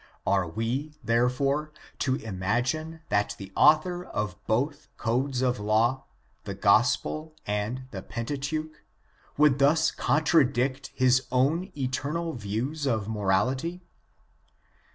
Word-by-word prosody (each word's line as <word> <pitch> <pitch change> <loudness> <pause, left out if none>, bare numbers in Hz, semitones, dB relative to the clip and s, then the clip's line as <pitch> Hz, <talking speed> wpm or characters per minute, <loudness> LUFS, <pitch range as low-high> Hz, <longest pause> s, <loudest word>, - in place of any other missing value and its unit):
Are 95 -3 +2
we, 120 - -3
therefore, 135 +6 +1 0.3
to 130 -2 +1
imagine 125 - -2
that 105 0 +1
the 95 -1 -9
author 175 +3 +4
of 105 - -3
both 130 +7 0
codes 125 +3 0
of 125 -2 +1
law, 110 +5 +1 0.4
the 100 - -5
Gospel 125 +10 +2
and 105 +5 -2
the 95 - -6
Pentateuch, 145 +8 -4 0.6
would 145 -2 +4
thus 155 +4 +4
con 150 +2 +1
tradict 135 -3 +2
his 130 0 +3
own 155 +9 +1
eternal 145 +5 -2
views 125 +7 -3
of 110 -5 0
morality? 110 - 0
130 Hz, 110 wpm, -27 LUFS, 110-150 Hz, 0.6 s, author